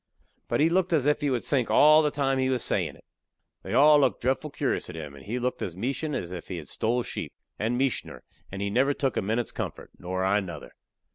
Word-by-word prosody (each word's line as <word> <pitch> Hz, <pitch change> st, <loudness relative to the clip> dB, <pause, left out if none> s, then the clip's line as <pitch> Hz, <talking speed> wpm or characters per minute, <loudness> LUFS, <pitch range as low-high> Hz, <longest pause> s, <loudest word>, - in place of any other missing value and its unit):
But -, -, 0 dB
he 155 Hz, -, +5 dB
looked 185 Hz, 0 st, +1 dB
as 145 Hz, -5 st, +2 dB
if 150 Hz, +1 st, +2 dB
he 145 Hz, -, +1 dB
would 125 Hz, -3 st, -1 dB
sink 130 Hz, -5 st, 0 dB
all 155 Hz, +1 st, +7 dB
the 150 Hz, -, +2 dB
time 135 Hz, -2 st, 0 dB
he 130 Hz, 0 st, +1 dB
was 130 Hz, -2 st, +1 dB
a -, -, +2 dB
sayin' -, -, 0 dB
it. -, -, -21 dB, 0.6 s
They -, -, -4 dB
all 150 Hz, +3 st, +7 dB
looked 140 Hz, -, +2 dB
dretful 130 Hz, +4 st, -1 dB
curious 140 Hz, -7 st, -2 dB
at 90 Hz, -, -8 dB
him, 75 Hz, -3 st, -7 dB
and 70 Hz, -, -13 dB
he 115 Hz, +5 st, -3 dB
looked 125 Hz, 0 st, -2 dB
as 85 Hz, -, -4 dB
meachin' 135 Hz, -, -2 dB
as 85 Hz, -, -4 dB
if 90 Hz, -2 st, -7 dB
he 90 Hz, -, -5 dB
had 75 Hz, -3 st, -8 dB
stole 120 Hz, +2 st, 0 dB
sheep -, -, -5 dB, 0.3 s
and 115 Hz, +3 st, 0 dB
meachin'er 135 Hz, -3 st, -2 dB, 0.3 s
and 95 Hz, +1 st, -4 dB
he 100 Hz, -, -2 dB
never 135 Hz, +5 st, +2 dB
took 135 Hz, -3 st, -1 dB
a -, -, +1 dB
minute's 110 Hz, +4 st, -1 dB
comfort, -, -, -6 dB
nor 95 Hz, +1 st, -2 dB
I 100 Hz, +2 st, +3 dB
nuther. 90 Hz, -6 st, -7 dB
125 Hz, 250 wpm, -27 LUFS, 100-145 Hz, 0.6 s, all